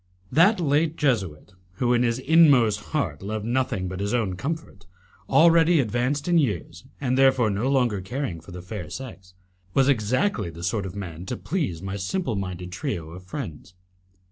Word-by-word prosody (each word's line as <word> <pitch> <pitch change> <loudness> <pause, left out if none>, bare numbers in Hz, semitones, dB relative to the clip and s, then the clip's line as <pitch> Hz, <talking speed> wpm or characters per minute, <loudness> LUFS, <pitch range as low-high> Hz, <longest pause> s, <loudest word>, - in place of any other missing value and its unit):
That 185 +6 +5
late 155 0 +1
Jesuit, 95 - -1 0.2
who 120 +6 +1
in 120 - +3
his 120 -1 +1
inmost 130 -8 +4
heart 100 - -2
loved 105 +2 -4
nothing 120 -6 -1
but 95 +1 -5
his 100 +4 -1
own 105 -6 0
comfort, 140 - -6 0.4
already 165 0 +5
advanced 125 +5 0
in 175 -1 +4
years, 105 - -2
and 130 -2 0
therefore 130 -5 +4
no 105 +7 -1
longer 120 -7 +1
caring 115 - -4
for 80 - -15
the 90 0 -8
fair 90 -4 -6
sex, 95 -4 -9 0.4
was 135 0 +4
exactly 125 - +1
the 85 +1 -10
sort 95 +2 -1
of 90 - -9
man 90 -3 -7
to 125 - -3
please 135 - -3
my 95 +1 -4
simpleminded 95 - -3
trio 85 -2 -4
of 90 +2 -11
friends. 95 - -7
110 Hz, 170 wpm, -25 LUFS, 95-140 Hz, 0.4 s, That